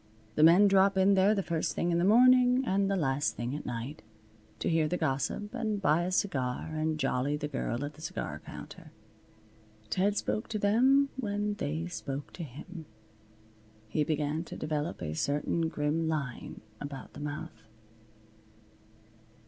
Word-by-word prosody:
The 150 - 0
men 175 +6 +7
drop 195 0 +4
in 190 +1 +5
there 195 +2 +4
the 195 - -1
first 165 -2 -2
thing 175 - 0
in 170 - +2
the - - +2
morning, 250 +4 +5
and 195 -2 +1
the 195 - +1
last 145 -3 0
thing 120 +3 -3
at 150 - -6
night, 120 +5 -5 0.6
to - - -3
hear 160 -2 +2
the 180 - -1
gossip 140 - -2
and 220 -4 -1
buy 170 -4 +3
a 180 - -2
cigar 135 -11 -1
and 155 0 -1
jolly 135 +1 0
the 150 - -3
girl 135 -2 -2
at 145 - -7
the 155 - -15
cigar - - -4
counter. - - -10 1.0
Ted 200 +2 +1
spoke 215 - -1
to 220 - -3
them 260 +7 +4
when 210 -3 -1
they 160 -4 -3
spoke 145 -5 -6
to 175 - -6
him. 155 +4 -9 1.0
He 150 +7 +1
began 150 +1 -1
to - - -8
develop 155 +1 -3
a 75 - -3
certain 150 - 0
grim 155 +2 -1
line 145 -6 -4 0.2
about 140 -2 -7
the - - -10
mouth. 145 -4 -6
160 Hz, 165 wpm, -30 LUFS, 145-200 Hz, 1.0 s, men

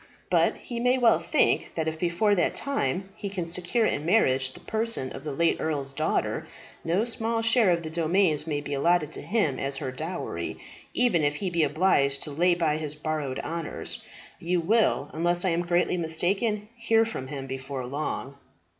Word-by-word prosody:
But - - +3
he 240 -1 -6
may 250 +2 +3
well 230 -9 +5
think 170 0 +1
that 160 -1 -1
if 160 0 -3
before 180 +5 +2
that 175 -4 +1
time 190 - -1
he 205 -2 -5
can 190 -3 -3
secure 180 +7 0
in 145 - 0
marriage 135 -8 +3
the - - -13
person 220 - -1
of 135 - -8
the 150 - -4
late 165 +4 +2
earl's 140 -3 -2
daughter, - - -1 0.4
no 180 +7 +1
small 230 -1 -1
share 225 -2 +4
of 170 -1 +2
the 160 - -4
domains 165 -1 +2
may 145 -2 -1
be 145 0 -5
allotted 155 +2 +2
to - - -7
him 200 - 0
as 135 0 -1
her 130 - -3
dowry, 160 +7 -4 0.4
even 235 -10 +3
if 145 0 +1
he 185 +3 -2
be 170 -1 +1
obliged 145 -3 +2
to 150 - -4
lay 175 +4 +3
by 160 -3 +1
his 155 -1 -4
borrowed 150 -3 -3
honours. 165 -1 -4 0.4
You 175 +1 0
will, 215 +7 +2
unless 175 +3 +1
I - - +3
am 170 0 +1
greatly 175 +1 +2
mistaken, 195 +6 0
hear 225 -1 +3
from 175 -13 -5
him 135 -1 -5
before 135 0 -5
long." 140 0 -4
170 Hz, 190 wpm, -27 LUFS, 145-200 Hz, 0.4 s, well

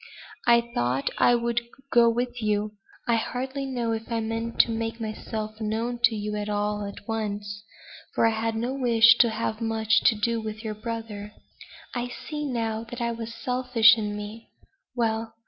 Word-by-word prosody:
I 235 0 +7
thought 125 +3 0
I 245 - +6
would 235 0 0 0.3
go 235 -1 +6
with 245 +1 -2
you. 210 0 0 0.4
I 235 -1 +3
hardly 265 +4 -3
know 240 -3 -1
if 225 +1 -4
I 230 - +1
meant 225 +1 -3
to 235 - -2
make 225 +1 -3
myself 215 0 -5
known 225 +3 -1
to 225 -2 +1
you 210 0 -3 0.2
all 210 0 -1
at 200 0 -9
once, 205 -2 -3 0.5
for - - +4
I 225 - +5
had 225 0 -1
no 240 +4 -1
wish 230 -3 +6
to 235 - +6
have 220 0 -2
much 225 -1 +2
to 225 - +6
do 230 +2 0
with 220 0 -6
your 215 -1 -3
brother. 215 -1 -6 0.6
I 245 -1 -2
see 295 +4 -5
now 225 -3 -2
that 245 - -6
it 235 -1 -1
was 230 0 -6
selfish 250 -2 +4
in 210 -2 -3
me. 210 +2 -8 0.5
Well! 225 -1 -1
225 Hz, 175 wpm, -26 LUFS, 215-235 Hz, 0.6 s, I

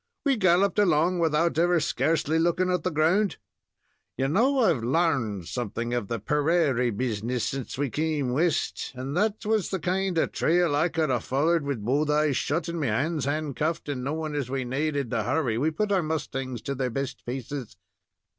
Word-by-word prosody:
We 275 -2 +3
galloped 190 -1 +3
along, 175 -2 +3
without 165 0 +2
ever 175 0 +3
scarcely 160 +1 +1
looking 175 +2 +1
at 180 -2 +1
the 185 - -1
ground. 175 +6 +2 0.8
You 135 +1 +1
know 250 - +3
I've 155 - +2
larned 120 - 0
something 120 +4 -3
of 120 -5 -1
the 115 +1 -3
perarie 150 - +1
business 115 +1 -2
since 135 -2 -4
we 140 -2 -1
came 150 -4 -1
West, 160 +1 0
and 130 +3 -5
that 210 +3 0
was 215 -2 +1
the 190 - -1
kind 185 +2 -1
of - - +1
trail 170 -2 +2
I 160 +4 +2
could 160 -3 0
have 120 -3 0
follered 155 +4 +1
wid 130 -7 -3
both 145 +5 +1
eyes 150 -1 +2
shut 160 +7 -1
and 170 0 -3
me 145 - 0
hands 140 +7 0
handcuffed, 150 +2 -2
and, 130 -3 -3
knowing 155 +2 -3
as 140 -4 -2
we 130 -1 -2
naaded 140 0 -1
to 115 -2 0
hurry, 120 -1 0
we 150 +5 +2
put 205 +6 -2
our 190 -2 +3
mustangs 135 -6 -4
to 140 - -2
their 130 -1 -1
best 135 +2 -4
paces." 125 -4 -6
150 Hz, 185 wpm, -26 LUFS, 130-170 Hz, 0.8 s, We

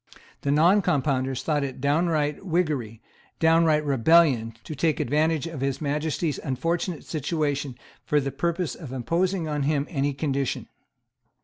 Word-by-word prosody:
The 140 - -2
Noncompounders 145 -6 +2
thought 150 -3 0
it 135 -2 -5
downright 150 +1 +1
Whiggery, 150 - -1 0.4
downright 160 -2 +4
rebellion; 135 -4 +3
to - - -6
take 155 +1 0
advantage 155 +3 +1
of 165 -5 -6
His 135 -1 -1
Majesty's 150 +1 -1
unfortunate 165 +5 -2
situation 145 -3 -2 0.3
for 150 - +2
the 135 -1 -2
purpose 170 +1 -1
of 145 -7 -9
imposing 170 +7 -1
on 150 -1 -2
him 145 0 +1
any 140 -2 0
condition. 135 -2 -2
150 Hz, 130 wpm, -25 LUFS, 135-165 Hz, 0.4 s, downright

